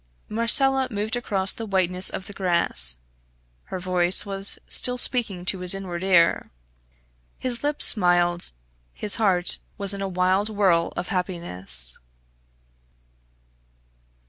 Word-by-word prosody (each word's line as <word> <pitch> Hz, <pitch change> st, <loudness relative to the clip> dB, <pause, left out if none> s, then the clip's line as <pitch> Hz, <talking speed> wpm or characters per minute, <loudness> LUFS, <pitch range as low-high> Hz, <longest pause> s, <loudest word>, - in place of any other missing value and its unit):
Marcella 265 Hz, +4 st, +3 dB
moved 215 Hz, +1 st, -3 dB
across 195 Hz, -5 st, -1 dB
the 225 Hz, -, -8 dB
whiteness 185 Hz, -1 st, +2 dB
of 190 Hz, -, -7 dB
the 205 Hz, -, -10 dB
grass; 170 Hz, -, +2 dB, 0.7 s
her -, -, -7 dB
voice 180 Hz, +1 st, +2 dB
was 195 Hz, 0 st, -6 dB
still 250 Hz, 0 st, +3 dB
speaking 225 Hz, -8 st, +2 dB
to 185 Hz, +1 st, 0 dB
his 180 Hz, +1 st, +2 dB
inward 185 Hz, -2 st, -7 dB
ear. 175 Hz, -3 st, +2 dB, 0.9 s
His 245 Hz, -2 st, -2 dB
lips 295 Hz, 0 st, +2 dB
smiled; 175 Hz, -3 st, +2 dB, 0.5 s
his 210 Hz, -, 0 dB
heart 180 Hz, -4 st, +1 dB, 0.2 s
was 200 Hz, -1 st, +1 dB
in 200 Hz, -, -7 dB
a 195 Hz, -, -3 dB
wild 185 Hz, +3 st, 0 dB
whirl 190 Hz, -6 st, +1 dB
of 175 Hz, -, -5 dB
happiness. 95 Hz, -, -2 dB
190 Hz, 120 wpm, -23 LUFS, 175-210 Hz, 0.9 s, Marcella